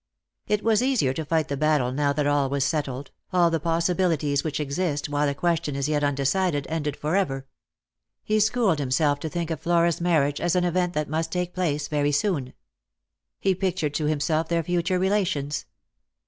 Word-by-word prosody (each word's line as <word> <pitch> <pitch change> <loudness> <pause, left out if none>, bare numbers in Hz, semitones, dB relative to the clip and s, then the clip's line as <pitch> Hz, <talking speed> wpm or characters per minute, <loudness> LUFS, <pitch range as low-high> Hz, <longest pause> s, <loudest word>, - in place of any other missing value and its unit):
It 210 0 0
was 220 -1 +3
easier 250 - +2
to 160 - -3
fight 155 -1 0
the 140 - -2
battle 150 -3 +2
now 140 +2 +1
that 145 0 0
all 145 -2 +2
was 140 0 0
settled 140 -3 -2
— - - -44
all 175 -2 +3
the 165 - +1
possibilities 165 -3 +1
which 155 -2 -2
exist 145 0 -2
while 145 0 +1
a 140 - -3
question 165 -1 0
is 140 0 -1
yet 150 -1 0
undecided 145 +2 +1
ended 150 -3 -2
for 155 +4 -1
ever. 135 -9 0 0.8
He 215 0 +1
schooled 215 -6 +2
himself 145 +2 +1
to 160 - -4
think 170 +1 -3
of 160 -2 -3
Flora's 170 0 +2
marriage 150 -5 +1
as 175 0 +1
an 180 - +2
event 180 0 0
that 150 -2 -1
must 160 +2 -2
take 180 0 -2
place 150 -5 -1
very 145 -1 +1
soon. 145 -4 0 0.9
He 195 - +2
pictured 180 -5 -1
to 155 - -1
himself 155 +2 0
their 170 -1 +1
future 175 +2 0
relations. 180 -7 0
155 Hz, 190 wpm, -25 LUFS, 145-175 Hz, 0.9 s, was